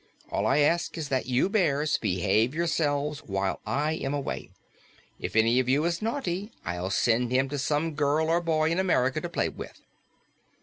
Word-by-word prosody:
All - - 0
I 135 - +3
ask 170 +4 +1
is 155 -3 -4
that 130 -2 -1
you 125 +6 +2
bears 155 -8 +1
behave 110 - +1
yourselves 150 -3 0
while 95 -1 -2
I 150 +3 0
am 145 -3 -2
away. 140 - -4 0.7
If - - -5
any 115 +3 +4
of 130 -1 0
you 145 +4 +3
is 170 0 -1
naughty, 215 -4 -2
I'll 90 +2 -3
send 120 +4 +2
him 130 +1 +2
to 145 0 -3
some 150 +4 0
girl 150 +2 +1
or 170 +2 +2
boy 160 -1 +1
in 170 - 0
America 135 -9 +1
to - - -4
play - - 0
with." - - -10
145 Hz, 180 wpm, -27 LUFS, 125-165 Hz, 0.7 s, any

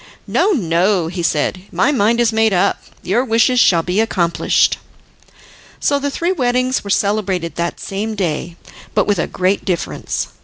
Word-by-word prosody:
"No, 405 - +1
no," 180 - +1
he 175 0 -4
said, 165 +2 0
"my 285 - +2
mind 235 -3 +2
is 235 -2 +2
made 220 -1 +2
up. 180 - +1 0.2
Your 235 +7 +1
wishes 245 +1 +2
shall 170 -7 +4
be 180 +4 -1
accomplished." 175 -6 +1 1.0
So 285 -1 +1
the 285 0 -2
three 335 +5 -1
weddings 255 -5 0
were 200 - -7
celebrated 200 -4 0
that 170 0 -2
same 215 +3 -4
day, 170 -3 -3 0.4
but - - +3
with 205 -4 0
a - - 0
great 185 +2 0
difference. 180 -3 -3
200 Hz, 160 wpm, -17 LUFS, 175-240 Hz, 1.0 s, shall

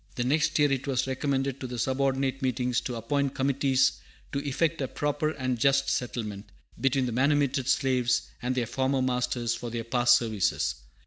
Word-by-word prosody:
The 120 - -1
next 155 +4 +1
year 145 -2 +3
it 135 +1 -1
was 130 -2 +1
recommended 135 0 -1
to 130 - -5
the 125 0 -6
subordinate 135 +1 0
meetings 125 -1 0
to 125 - -4
appoint 135 +4 -1
committees 135 0 +2 0.3
to 140 - -1
effect 155 +3 0
a 135 - -1
proper 145 +2 -1
and 130 -5 -2
just 135 +1 +3
settlement 105 -5 -3 0.3
between 135 -1 +2
the 120 - -2
manumitted 140 +1 +1
slaves 125 -4 +2 0.2
and 125 +1 -1
their 125 -2 0
former 130 +2 0
masters, 125 -2 0
for 120 - -5
their 115 0 -4
past 120 +1 +4
services. 110 -5 0
130 Hz, 175 wpm, -27 LUFS, 125-140 Hz, 0.3 s, past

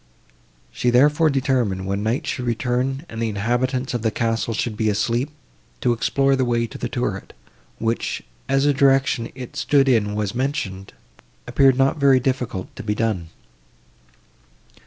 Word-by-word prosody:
She, 125 - 0
therefore, 150 +6 +4
determined, 125 -9 0
when 100 +1 -2
night 120 +9 -1
should 125 -4 -3
return, 125 +4 -1
and 115 0 -6
the 115 - 0
inhabitants 120 +5 -1
of 120 - -1
the 110 - +1
castle 115 +1 -1
should 110 0 -2
be 110 0 +1
asleep, 115 +6 0 0.5
to 120 - +3
explore 135 +4 +2
the 130 - +1
way 120 -1 +1
to 115 - -9
the - - -3
turret, - - -3 0.4
which, 115 +1 -2 0.3
as 135 0 +2
the 145 0 +4
direction 135 -3 +2
it 130 -2 -8
stood 140 -2 +3
in 105 -5 +2
was 105 -2 -2
mentioned, 120 -8 -3 0.5
appeared 135 -2 +4
not 135 +3 +2
very 140 -2 +5
difficult 125 -7 -3
to - - -5
be 105 -1 -2
done. 105 -7 -1
120 Hz, 155 wpm, -22 LUFS, 110-135 Hz, 0.5 s, very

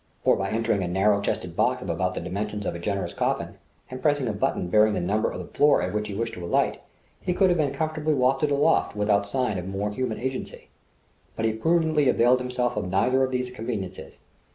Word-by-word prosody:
Or - - +4
by 95 0 -2
entering 110 -2 0
a 90 - -1
narrow 100 +3 +2
chested 90 -4 -3
box 125 +4 +1
of - - -7
about 90 +2 -1
the - - -3
dimensions 105 +4 -4
of - - -1
a 85 - -6
generous 100 +2 -2
coffin, - - -2 0.3
and 130 - -6
pressing 145 -4 +1
a 110 - -1
button 100 -3 -1
bearing 105 +3 +4
the - - 0
number 100 +5 0
of - - -6
the 90 - -6
floor 145 +1 +5
at 90 - -3
which 105 0 -1
he 100 - -5
wished 115 +2 -2
to 90 - -7
alight, 85 - 0 0.4
he 180 -1 -1
could 190 -1 +4
have 175 - +2
been 145 -3 +1
comfortably 155 +1 -1
wafted 135 +3 +2
aloft 145 -1 +2
without 105 -1 +1
sign 125 -4 -1
of 90 - -6
more 100 +2 -2
human 110 0 -3
agency. 130 +1 -5 0.7
But 110 - -2
he 110 - +1
prudently 155 +2 +2
availed 125 +1 +4
himself 125 -1 -1
of 90 - -3
neither 125 +8 +2
of 130 - +1
these 125 -1 -2
conveniences. 110 -6 -6
110 Hz, 225 wpm, -25 LUFS, 100-130 Hz, 0.7 s, floor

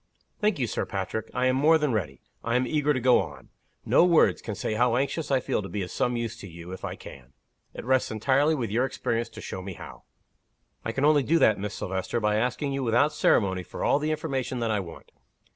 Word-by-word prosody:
"Thank 210 -3 +1
you, 130 - 0
Sir - - -2
Patrick. 100 +2 -4
I 125 - 0
am 130 0 +3
more 155 +4 +5
than 150 -5 0
ready, 80 - -3 0.2
I 115 +1 -1
am 125 +1 +2
eager 150 +3 +1
to 135 - +1
go 125 0 +5
on. - - -9 0.4
No - - +5
words 175 -2 +4
can 105 - -5
say 110 - -3
how 120 +2 +2
anxious 140 +4 -1
I 135 -2 +3
feel 120 - -1
to 95 - -7
be 100 -2 -3
of 90 - -7
some 125 -1 0
use 115 -2 -3
to 100 - -9
you, 85 0 -10
if 95 - -8
I - - -4
can. 65 -1 -13 0.4
It - - -7
rests 130 0 +2
entirely 135 +8 +2
with 120 -7 -3
your 120 +4 +2
experience 115 -3 -2
to - - -10
show 95 - -6
me 95 0 -6
how." - - -11 0.8
"I 115 - -2
can 135 +5 0
only 150 -1 +5
do 160 +5 +2
that, 110 -10 +4
Miss 105 0 -4
Silvester, 95 +5 -3
by 105 -1 +1
asking 125 +5 -1
you 135 - -2
without 125 +5 +2
ceremony 95 -10 +2
for - - -7
all 140 - +3
the 150 +1 -1
information 135 -5 -2
that 115 -2 -1
I 105 - +1
want. 90 -4 -10
120 Hz, 240 wpm, -26 LUFS, 105-140 Hz, 0.8 s, more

